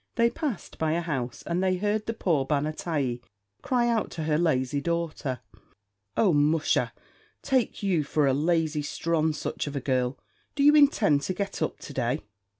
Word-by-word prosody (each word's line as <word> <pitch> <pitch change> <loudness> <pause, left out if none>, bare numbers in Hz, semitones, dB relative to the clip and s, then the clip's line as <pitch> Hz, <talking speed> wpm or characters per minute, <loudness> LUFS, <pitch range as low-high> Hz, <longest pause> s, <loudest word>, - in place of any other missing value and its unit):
They 235 0 +3
passed 280 - -4
by 160 -1 +1
a 170 - 0
house, 135 -7 -3
and 175 +2 -1
they 185 -1 +2
heard 210 +2 -1
the 230 - -2
poor 165 -10 +1
ban 145 +1 0
a 155 - -2
t'yee 140 -8 -2 0.4
cry 245 -2 +1
out 230 -2 +1
to 160 - -2
her 155 -1 +1
lazy 140 -4 +1
daughter, 160 -6 -2 0.8
"Oh, 200 -6 +4
musha, 150 +2 +2 0.5
take 260 -5 0
you 180 -6 +2
for 145 +1 +1
a 135 - +3
lazy 160 +1 +1
sthronsuch 155 0 -1
of 145 - -5
a - - 0
girl! 130 -1 0 0.4
do 280 - +1
you 295 +1 +7
intend 230 - +5
to 185 +6 -3
get 200 -2 -3
up 155 - -1
to 145 - -8
day?" 125 -2 -1
160 Hz, 180 wpm, -27 LUFS, 145-195 Hz, 0.8 s, you